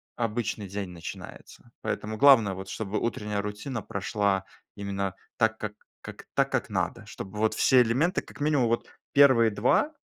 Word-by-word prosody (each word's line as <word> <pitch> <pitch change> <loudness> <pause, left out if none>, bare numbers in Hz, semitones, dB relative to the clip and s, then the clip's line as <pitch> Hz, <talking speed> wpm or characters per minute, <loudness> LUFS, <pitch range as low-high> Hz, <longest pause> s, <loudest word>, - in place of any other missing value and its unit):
обычный 115 -3 -2
день 100 -1 -4
начинается. 85 -2 -10
Поэтому 110 +1 -3
главное, 115 -7 +6
вот 95 +1 -8
чтобы 105 -1 -3
утренняя 105 -3 -2
рутина 105 +4 -5
прошла 100 0 -1 0.3
именно 100 -2 -3 0.2
так 110 -2 +2
как 105 -1 -5 0.3
как - - -10
так - - +2
как - - -1
надо. - - -2
Чтобы 100 +2 -8
вот 110 0 +2
все 130 -1 +5
элементы, 130 +10 +1
как - - -15
минимум 145 -5 +2
вот 115 +1 0 0.3
1 130 -6 +6
2- 125 - +2
105 Hz, 155 wpm, -27 LUFS, 100-120 Hz, 0.3 s, главное